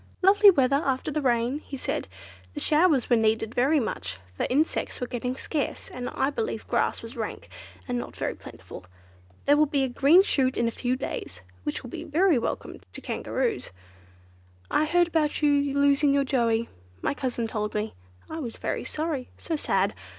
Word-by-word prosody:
"Lovely 405 Hz, +2 st, +8 dB
weather 275 Hz, -4 st, +3 dB
after 270 Hz, +2 st, -1 dB
the 305 Hz, -, -1 dB
rain," 245 Hz, +1 st, +1 dB
he 280 Hz, -2 st, -8 dB
said; -, -, -3 dB, 0.5 s
"the -, -, -3 dB
showers 300 Hz, -4 st, +3 dB
were 240 Hz, -, +4 dB
needed 220 Hz, 0 st, +1 dB
very 275 Hz, +6 st, +3 dB
much, 95 Hz, -, -3 dB, 0.2 s
for -, -, -1 dB
insects 295 Hz, +5 st, 0 dB
were 250 Hz, -, -2 dB
getting 250 Hz, +1 st, -3 dB
scarce, 290 Hz, +2 st, -3 dB
and 250 Hz, 0 st, -5 dB
I 270 Hz, +2 st, 0 dB
believe 445 Hz, +9 st, -3 dB
grass -, -, 0 dB
was -, -, -9 dB
rank, -, -, -5 dB, 0.4 s
and 245 Hz, -1 st, -1 dB
not -, -, -7 dB
very -, -, -2 dB
plentiful. 95 Hz, -, -11 dB, 0.6 s
There 290 Hz, -, +6 dB
will 305 Hz, +1 st, +4 dB
be 280 Hz, -1 st, +1 dB
a -, -, +1 dB
green 280 Hz, +9 st, +5 dB
shoot 260 Hz, -8 st, +1 dB
in 235 Hz, -, +2 dB
a -, -, 0 dB
few 245 Hz, +2 st, -1 dB
days, 90 Hz, -, -5 dB, 0.2 s
which 145 Hz, -, -4 dB
will 245 Hz, -, -9 dB
be -, -, -6 dB
very 325 Hz, -1 st, +3 dB
welcome -, -, -4 dB
to -, -, -8 dB
Kangaroos. 460 Hz, -4 st, -2 dB, 1.0 s
I 305 Hz, -, +3 dB
heard 345 Hz, +2 st, +3 dB
about 310 Hz, -2 st, 0 dB
you 285 Hz, -1 st, +3 dB
losing 280 Hz, 0 st, +4 dB
your 280 Hz, -, +3 dB
Joey—my 225 Hz, -, -1 dB
cousin 250 Hz, -5 st, -2 dB
told 210 Hz, -1 st, -3 dB
me. 210 Hz, +1 st, -2 dB, 0.3 s
I 320 Hz, -, -6 dB
was 240 Hz, -7 st, -5 dB
very -, -, -3 dB
sorry; 305 Hz, -5 st, -3 dB
so 330 Hz, -, -3 dB
sad. 195 Hz, -9 st, +1 dB
270 Hz, 180 wpm, -26 LUFS, 235-300 Hz, 1.0 s, Lovely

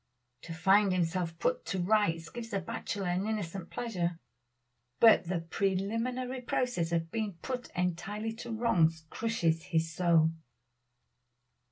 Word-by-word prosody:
To 165 Hz, -, -7 dB
find 195 Hz, +3 st, +4 dB
himself 170 Hz, -1 st, 0 dB
put 165 Hz, -, 0 dB
to 190 Hz, -, -2 dB
rights 175 Hz, -4 st, +1 dB
gives 235 Hz, -1 st, -7 dB
a 195 Hz, -, +1 dB
bachelor 190 Hz, +2 st, -4 dB
an 180 Hz, +3 st, 0 dB
innocent 195 Hz, -5 st, -3 dB
pleasure, 180 Hz, -8 st, -2 dB, 0.8 s
but 225 Hz, -5 st, +7 dB
the 170 Hz, -1 st, -1 dB
preliminary 230 Hz, +9 st, -1 dB
process 240 Hz, -9 st, -1 dB
of 165 Hz, -1 st, -1 dB
being 215 Hz, -3 st, -2 dB
put 255 Hz, -2 st, -4 dB
entirely 195 Hz, +5 st, -2 dB
to 240 Hz, -, -6 dB
wrongs 165 Hz, -9 st, +2 dB
crushes 170 Hz, -8 st, 0 dB
his 160 Hz, 0 st, 0 dB
soul. 165 Hz, -2 st, +4 dB
185 Hz, 130 wpm, -31 LUFS, 165-225 Hz, 0.8 s, but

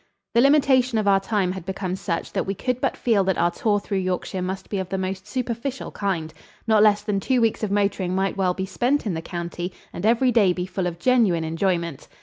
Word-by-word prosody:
The 235 Hz, -, +5 dB
limitation 265 Hz, -3 st, +4 dB
of 215 Hz, -2 st, 0 dB
our 195 Hz, -1 st, +5 dB
time 195 Hz, -2 st, 0 dB
had 190 Hz, -1 st, -6 dB
become 185 Hz, 0 st, -3 dB
such 170 Hz, -3 st, -3 dB
that -, -, -1 dB
we 195 Hz, -, -1 dB
could 250 Hz, +4 st, -2 dB
but -, -, 0 dB
feel 220 Hz, -5 st, +2 dB
that 190 Hz, -1 st, +1 dB
our 175 Hz, -, +2 dB
tour 205 Hz, +1 st, +1 dB
through 200 Hz, -1 st, -2 dB
Yorkshire 185 Hz, 0 st, -2 dB
must 185 Hz, +1 st, -4 dB
be 200 Hz, -, -3 dB
of 185 Hz, -1 st, -4 dB
the 195 Hz, -, -2 dB
most 190 Hz, +1 st, -4 dB
superficial 250 Hz, +3 st, -3 dB
kind. 170 Hz, -6 st, -2 dB, 0.3 s
Not 220 Hz, -2 st, +4 dB
less 210 Hz, -1 st, +4 dB
than 210 Hz, -2 st, 0 dB
two 255 Hz, +5 st, +1 dB
weeks 225 Hz, -2 st, +1 dB
of 215 Hz, -, -1 dB
motoring 200 Hz, -2 st, 0 dB
might 195 Hz, 0 st, 0 dB
well 185 Hz, -2 st, +1 dB
be 190 Hz, -, -2 dB
spent 245 Hz, +9 st, 0 dB
in 200 Hz, -, -1 dB
the 160 Hz, -, -3 dB
county 175 Hz, +1 st, -5 dB, 0.2 s
and 175 Hz, -, -6 dB
every 235 Hz, +4 st, +3 dB
day 205 Hz, -6 st, +4 dB
be 180 Hz, 0 st, -3 dB
full 185 Hz, -1 st, -2 dB
of 170 Hz, -1 st, -4 dB
genuine 210 Hz, -6 st, +3 dB
enjoyment. 170 Hz, -2 st, -1 dB
195 Hz, 230 wpm, -23 LUFS, 180-225 Hz, 0.3 s, The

